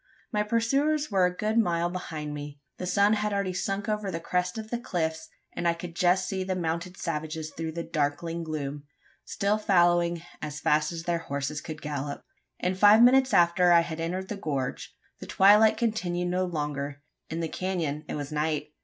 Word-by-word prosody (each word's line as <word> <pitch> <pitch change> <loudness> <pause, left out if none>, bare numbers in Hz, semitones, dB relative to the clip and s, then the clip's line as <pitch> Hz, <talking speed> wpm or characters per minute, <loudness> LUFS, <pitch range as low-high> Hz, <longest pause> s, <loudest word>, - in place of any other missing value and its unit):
My 210 -3 +1
pursuers 275 +7 +1
were 190 -2 +4
a 180 0 -6
good 215 +1 +1
mile 170 -5 +1
behind 155 -5 -5
me. 145 0 -7 0.2
The 180 - -3
sun 200 +3 +4
had 210 -1 0
already 200 -2 -1
sunk 195 +3 -2
over 210 -2 -1
the 165 - -3
crest 180 +3 -1
of 220 0 -7
the 240 - -1
cliffs, 160 -7 -3 0.3
and 175 - -1
I 170 - +2
could 170 0 -8
just 180 +1 +2
see 190 -1 -2
the 185 0 -2
mounted 170 +1 -3
savages 155 -1 -4
through 160 0 -5
the 170 +1 -4
darkling 165 +1 -2
gloom 145 -2 -4 0.4
still 205 +2 0
fallowing 175 -4 +3 0.2
as 150 0 -5
fast 150 +1 +2
as 165 -1 -5
their 170 -1 0
horses 140 0 -3
could 155 -1 -8
gallop. 145 -1 -4 0.3
In 180 - 0
five 205 +4 +7
minutes 260 +1 +5
after, 175 -1 +4
I 170 -1 +7
had 165 -1 -5
entered 180 +3 -3
the 210 - -4
gorge. 140 -8 -3 0.3
The - - -9
twilight 210 +3 +6
continued 180 -7 -1
no 185 +1 +1
longer: 145 -4 -4 0.3
in 165 +1 -3
the 165 - -1
canon 160 -5 -2
it - - -4
was 145 0 -5
night. 150 0 -1
175 Hz, 190 wpm, -27 LUFS, 155-195 Hz, 0.4 s, five